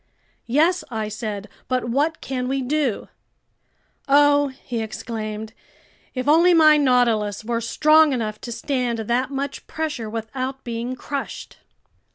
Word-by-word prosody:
"Yes!" 325 +9 +2
I 220 -3 -3
said. 210 -1 -5 0.2
"But 255 -1 0
what 290 +7 0
can 255 -2 -3
we 270 0 -1
do?" 275 -4 -1 1.0
"Oh," 290 +1 +5
he 260 -3 -6
exclaimed, 220 -1 -5 0.6
"if 255 +1 -3
only 340 +4 +6
my 310 -2 +7
Nautilus 235 -7 +2
were 235 0 -1
strong 305 +6 +4
enough 220 -5 -3
to 240 - -6
stand 250 -1 -1
that 240 +4 0
much 280 0 -4
pressure 300 -9 -3
without 255 +4 -4
being 235 +2 -4
crushed!" 280 +2 -6
255 Hz, 130 wpm, -22 LUFS, 225-290 Hz, 1.0 s, my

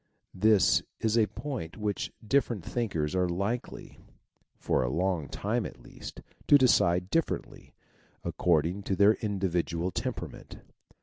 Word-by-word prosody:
This 105 +1 +4 0.2
is 110 0 +1
a 110 -2 +4
point 125 - -6
which 105 -2 -2 0.2
different 120 -7 +1
thinkers 85 -11 -2
are 90 -1 +1
likety, 100 +8 -4 0.6
for - - +1
a 60 - 0
long 85 0 -1
time - - -1
at - - -9
least, - - -10 0.3
to 145 - +8
decide 90 -8 +3
differently, 165 -1 -2 0.5
accord 80 -4 +2
ing 90 +4 -3
to 95 - -1
their 100 +2 +6
individual 90 -4 -1
temperament. - - -5
95 Hz, 130 wpm, -29 LUFS, 85-110 Hz, 0.6 s, to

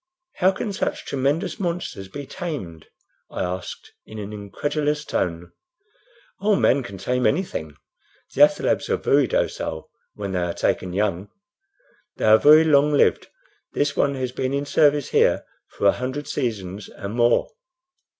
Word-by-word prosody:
"How 185 - +4
can 200 +2 -4
such - - -3
tremendous 140 - -1
monsters 170 - -3
be 140 +8 -8
tamed?" 135 - -6 0.4
I - - -3
asked, 90 0 -6
in 110 - -11
an 105 0 -6
incredulous 145 +8 -2
tone. 85 -1 -2 0.9
"Oh, 205 +1 +2
man 140 -6 +3
can 110 -6 -8
tame 125 +5 0
anything. 140 - -2 0.6
The - - 0
athalebs - - -1
are - - +2
very 140 -2 +3
docile 80 -5 -2 0.2
when 100 -2 -5
they 90 - -1
are 85 -1 -2
taken 90 -1 -1
young. 100 -1 -1 0.9
They - - -1
are 110 0 +7
very 155 +4 +7
long 150 -1 +4
lived. 145 - +3 0.5
This 145 0 0
one 140 0 +1
has 130 -1 -3
been 130 +2 -2
in 140 +1 -2
service 145 -1 +3
here - - +2 0.2
for - - -5
a 100 - +7
hundred 130 +4 -4
seasons 105 -7 -4
and 100 0 -7
more." 120 - +2
130 Hz, 150 wpm, -23 LUFS, 100-145 Hz, 0.9 s, are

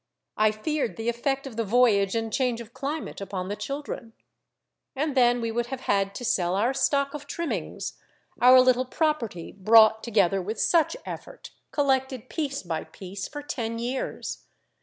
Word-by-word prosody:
I 215 0 +4
feared 275 +4 -2
the 225 +1 -1
effect 270 +4 -1
of 250 -5 -8
the 230 - +1
voyage 215 -3 +3
and 225 -1 -2
change 250 -3 +1
of 230 0 -10
climate 280 -1 -4
upon 190 -1 -4
the 205 - -2
children. 275 -3 -6 0.8
And 290 +1 -1
then 245 -1 +4
we 230 -1 -1
would 240 +1 -1
have 260 0 -5
had 195 -3 0
to 245 - -5
sell 180 -4 +1
our 230 +7 +2
stock 280 +1 +1
of 290 -1 -7
trimmings, 335 +2 -4 0.4
our 255 +1 +9
little 255 0 +3
property 255 - -1
brought 220 +2 +6
together 195 -4 +2
with 210 +4 -4
such 340 +7 +3
effort, - - -8 0.2
collected 265 -4 0
piece 285 -4 -3
by 165 -3 -3
piece 190 +4 -7
for 290 0 -7
ten 230 -5 -3
years. 245 +3 -4
240 Hz, 165 wpm, -26 LUFS, 215-275 Hz, 0.8 s, our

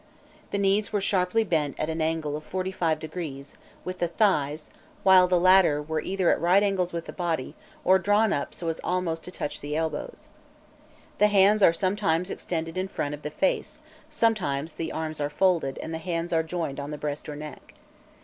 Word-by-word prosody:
The - - -2
knees 200 +1 +1
were 210 - +1
sharply 195 +2 +1
bent 155 -8 -1
at 155 - -1
an 160 0 -2
angle 155 -2 -1
of 155 0 -8
45° 160 -5 -3 0.3
with 185 0 -5
the 175 - +1
thighs, 155 -6 0 0.3
while 185 -1 +7
the 180 -1 +3
latter 185 -4 +5
were 155 +1 -2
either 190 -2 +1
at - - 0
right 180 +4 +4
angles 190 -3 0
with 170 -1 -4
the - - -8
body, 165 -6 -2 0.3
or 190 +1 +6
drawn 205 +2 +3
up 140 - -3
so 170 - -6
as 160 - -4
almost 175 -3 -1
to 180 - -7
touch 150 - -5
the 145 +1 -4
elbows. 160 -2 -4 0.9
The 210 - +6
hands 205 +1 +4
are 180 - +7
sometimes 185 0 0
extended 165 0 -4
in 190 - -1
front 145 -6 -3
of 150 - -7
the 150 - -4
face, 190 - -1 0.3
sometimes 185 - 0
the 160 -1 -4
arms 155 -1 -4
are 145 - 0
folded 165 -4 +1
and 160 - -5
the 160 - -3
hands 170 0 -3
joined 160 -5 -3
on 140 0 -5
the 150 - -5
breast 150 0 -4
or 150 - -5
neck. 150 +1 -10
170 Hz, 190 wpm, -26 LUFS, 155-190 Hz, 0.9 s, while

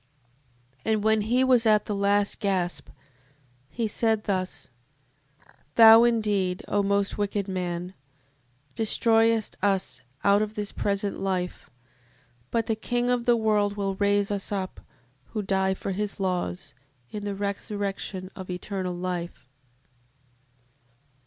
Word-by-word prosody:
And 220 -2 0
when 220 0 +3
he 245 +5 +2
was 250 -3 +4
at 215 -1 +4
the 210 - -3
last 200 0 +1
gasp, 190 -4 -1 0.8
he 230 +4 -2
said 220 0 0
thus: 185 - -3 1.0
Thou 225 +1 +9
indeed, 205 -6 0
O 205 - +1
most 200 +1 0
wicked 205 -1 -1
man, 180 -1 -3 0.8
destroyest 225 0 +2
us 185 -10 0 0.2
out 200 +1 +4
of 215 0 -3
this 210 -1 -3
present 200 0 -2
life: 185 -2 -3 0.8
but 230 -1 0
the 225 - 0
King 245 +2 -1
of 245 -1 0
the 240 -1 +4
world 210 -2 +1
will 195 -1 -1
raise 200 +1 +1
us 200 0 -2
up, 190 -2 -3 0.5
who 215 -2 -2
die 190 -1 +1
for 195 - -4
his 205 +1 -3
laws, 180 - -2 0.4
in 210 - -5
the 205 -1 -3
resurrection 200 -1 -4
of 190 -3 -8
eternal 180 0 -4
life. 175 -7 -5
200 Hz, 125 wpm, -26 LUFS, 190-215 Hz, 1.0 s, Thou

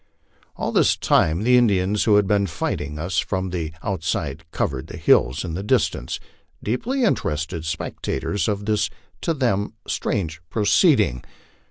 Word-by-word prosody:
All - - -2
this - - +3
time 80 +6 +2
the 125 +2 +5
Indians 100 -3 +2
who 105 -2 +5
had 105 -1 +4
been 100 0 +2
fighting 75 -3 -3
us 85 +1 -1
from 95 0 -2
tho 85 -3 -2 0.2
outside 80 -5 -2
covered 65 -4 -2
the - - -8
hills 65 +7 +3
in 85 - -4
the 90 - -3
distance, 100 -10 0 0.4
deeply 245 - -1
interested 80 - -1
spectators 80 +5 -2
of 105 -1 -1
this 105 -1 +1 0.3
to 165 - 0
them 110 -7 0
strange 80 -4 -2
proceeding. 105 - +3
95 Hz, 145 wpm, -23 LUFS, 80-105 Hz, 0.4 s, the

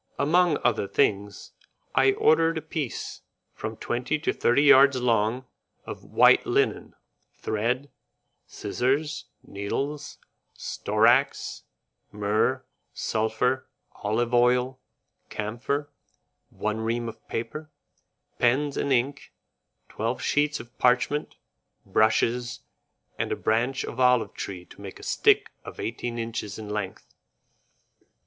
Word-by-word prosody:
Among 165 +2 +3
other 110 -4 +1
things, 100 +1 0 0.4
I 400 - +4
ordered 165 - +3
a - - -2
piece, 155 -5 -4 0.3
from 110 0 -6
twenty 125 +5 -1
to 150 - -1
thirty 120 +4 +3
yards 140 -2 +7
long, 115 +1 +1 0.4
of - - -8
white - - +5
linen, - - 0 0.4
thread, 125 +6 -2 0.6
scissors, 145 +4 -1 0.2
needles, 140 +9 -4 0.4
storax, 115 +6 +1 0.5
myrrh, 105 +5 0 0.3
sulphur, 110 +4 0 0.2
olive 115 +4 -2
oil, 125 +2 +3 0.5
camphor, 125 +7 -3 0.6
one 110 +1 -3
ream 115 +1 -1
of 110 -1 -10
paper, 150 +8 -5 0.7
pens 135 +4 +2
and 140 - -1
ink, 135 +2 0 0.6
twelve 115 +3 -3
sheets 150 +1 +1
of 120 +1 -12
parchment, 125 +4 +2 0.5
brushes, 120 +2 +1 0.6
and - - -1
a - - +1
branch 120 +4 0
of 125 - -7
olive 125 -2 +3
tree 90 -3 -6
to - - -15
make 100 -2 -8
a - - -13
stick - - +3
of - - -10
eighteen 120 +1 -4
inches 115 -3 -4
in 110 -1 -8
length. 105 -2 -5
120 Hz, 110 wpm, -26 LUFS, 110-140 Hz, 0.7 s, yards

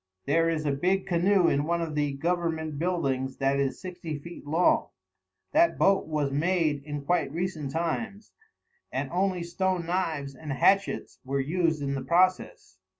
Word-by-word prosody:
There 165 +4 +3
is 155 -2 -1
a 145 - +2
big 180 +7 +1
canoe 180 +1 +3
in 145 -1 +2
one 170 +1 0
of 165 -2 -3
the 145 -1 0
Government 160 -1 -2
buildings 135 -7 -1
that 135 +1 +1
is 135 -1 -1
sixty 175 -4 -6
feet 170 0 -11
long. 165 +4 +2 0.6
That 330 +3 +4
boat 195 -3 +3
was 150 -3 -1
made 155 -1 +1
in 145 -1 -6
quite 175 -3 +1
recent 165 -3 -3
times, 195 +7 -3 0.6
and - - -3
only 185 -1 0
stone 180 0 -1
knives 160 -6 -2
and 145 +1 -6
hatchets 195 +8 +1
were 140 +1 -2
used 160 +1 0
in 140 0 -1
the 135 - -2
process. 180 +6 +1
165 Hz, 160 wpm, -27 LUFS, 145-180 Hz, 0.6 s, That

